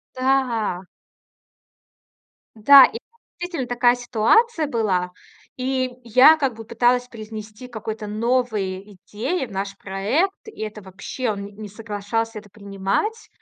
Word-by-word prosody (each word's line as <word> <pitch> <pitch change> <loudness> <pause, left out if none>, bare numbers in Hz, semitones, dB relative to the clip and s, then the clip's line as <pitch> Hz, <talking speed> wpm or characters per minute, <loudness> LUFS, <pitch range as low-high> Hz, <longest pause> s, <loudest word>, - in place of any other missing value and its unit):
Да. 255 -8 0 1.7
Да. 275 +5 +9
И 460 - -7 0.4
действительно 340 -8 -3
такая 245 0 +3
ситуация 295 - +2
была. 200 -8 0 0.5
И 255 0 -1
я 255 +7 +7
как 275 -6 -1
бы 225 0 -10
пыталась 245 +2 +1
привнести 215 +1 -9
какой-то 220 -2 -6
новые 210 -3 -1
идеи 215 - -3
в - - -17
наш 195 +1 -4
проект. 215 - 0
И 440 - -12
это 215 -1 -6
вообще, 200 +6 -4
он 200 -1 -4
не 205 - -10
не 210 +1 -9
соглашался 215 +2 -4
это 205 -1 -14
принимать. 200 - -3
225 Hz, 125 wpm, -22 LUFS, 205-255 Hz, 1.7 s, Да